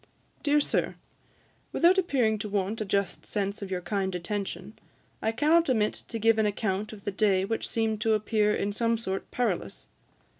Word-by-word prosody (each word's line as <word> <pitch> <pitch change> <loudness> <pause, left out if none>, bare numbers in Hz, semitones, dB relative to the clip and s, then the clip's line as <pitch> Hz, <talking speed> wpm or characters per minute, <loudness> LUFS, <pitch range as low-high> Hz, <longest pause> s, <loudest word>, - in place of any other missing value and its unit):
DEAR 295 0 +3
SIR, 290 - 0 0.8
Without 360 +3 +4
appearing 245 - +1
to 210 - -4
want 205 +2 -1
a - - -1
just 200 -1 -1
sense 200 0 -2
of 200 - -5
your 185 -1 -2
kind 190 -1 -2
attention, 190 +1 -4 0.5
I 220 - +1
cannot 305 +7 +3
omit 215 -4 +2
to 230 - -4
give 225 0 +3
an 215 - +3
account 205 0 -2
of 210 -3 -11
the 205 - -1
day 195 -2 +2
which 225 +2 -2
seemed 220 -2 0
to 220 0 +3
appear 215 0 +2
in 205 -1 -1
some 230 +1 +1
sort 195 -4 -4
perilous. 230 -8 -2
215 Hz, 180 wpm, -28 LUFS, 200-225 Hz, 0.8 s, Without